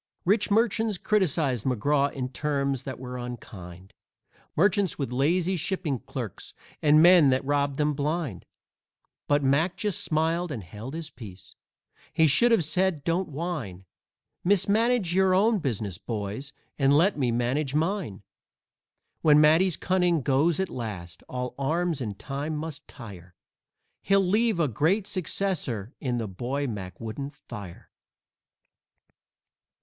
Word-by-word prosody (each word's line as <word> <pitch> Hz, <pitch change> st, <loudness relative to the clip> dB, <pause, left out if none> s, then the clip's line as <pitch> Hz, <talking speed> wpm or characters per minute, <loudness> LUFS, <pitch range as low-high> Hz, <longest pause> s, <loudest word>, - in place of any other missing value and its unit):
Rich 205 Hz, +3 st, +2 dB
merchants 220 Hz, -1 st, +2 dB
criticised 160 Hz, -, +1 dB
McGraw 140 Hz, +3 st, +1 dB
in 130 Hz, -2 st, -4 dB
terms 140 Hz, -1 st, -2 dB
that 135 Hz, -2 st, -5 dB
were 125 Hz, 0 st, -7 dB
unkind 95 Hz, -7 st, -9 dB, 0.6 s
Merchants 195 Hz, +2 st, +2 dB
with 135 Hz, -4 st, -3 dB
lazy 170 Hz, +8 st, +1 dB
shipping 175 Hz, -, -2 dB
clerks -, -, -7 dB, 0.3 s
and 155 Hz, +1 st, +6 dB
men 175 Hz, -5 st, +7 dB
that 130 Hz, +1 st, +1 dB
robbed 140 Hz, -1 st, 0 dB
them 150 Hz, 0 st, +1 dB
blind. 145 Hz, -, -3 dB, 0.8 s
But 145 Hz, 0 st, +2 dB
Mac 145 Hz, +7 st, +2 dB
just 210 Hz, -4 st, -2 dB
smiled 165 Hz, +2 st, 0 dB
and 115 Hz, -8 st, -5 dB
held 110 Hz, -, -8 dB
his 160 Hz, -2 st, -6 dB
peace. 100 Hz, -8 st, -11 dB, 0.6 s
He 160 Hz, -, +4 dB
should 235 Hz, -, +4 dB
have 210 Hz, -9 st, +3 dB
said: 175 Hz, -1 st, 0 dB
"Don't 170 Hz, +2 st, 0 dB
whine! 140 Hz, -, -5 dB, 0.6 s
Mismanage 205 Hz, +1 st, +2 dB
your 190 Hz, 0 st, +3 dB
own 215 Hz, +3 st, +3 dB
business, 110 Hz, -, -3 dB
boys, 110 Hz, +5 st, -4 dB, 0.3 s
and 140 Hz, +1 st, +4 dB
let 185 Hz, +6 st, +3 dB
me 130 Hz, -5 st, 0 dB
manage 130 Hz, +4 st, -1 dB
mine!" 160 Hz, -, -1 dB, 1.0 s
When 150 Hz, -1 st, +6 dB
Matty's 160 Hz, +4 st, +4 dB
cunning 180 Hz, -4 st, +1 dB
goes 145 Hz, +5 st, +2 dB
at 190 Hz, -, -1 dB
last 90 Hz, -7 st, -6 dB
all 125 Hz, 0 st, -4 dB
arms 160 Hz, +2 st, 0 dB
in 105 Hz, -5 st, -4 dB
time 145 Hz, +7 st, -4 dB
must 150 Hz, -1 st, -6 dB
tire 95 Hz, -8 st, -12 dB, 0.7 s
He'll 195 Hz, 0 st, +3 dB
leave 215 Hz, 0 st, +2 dB
a 160 Hz, -, +3 dB
great 165 Hz, -, +1 dB
successor 175 Hz, -, -2 dB
in 125 Hz, -4 st, -1 dB
the 115 Hz, -2 st, -2 dB
boy 125 Hz, +9 st, -3 dB
Mac 100 Hz, -7 st, -6 dB
wouldn't 135 Hz, +6 st, -6 dB
fire. 100 Hz, -9 st, -10 dB
145 Hz, 135 wpm, -26 LUFS, 125-180 Hz, 1.0 s, men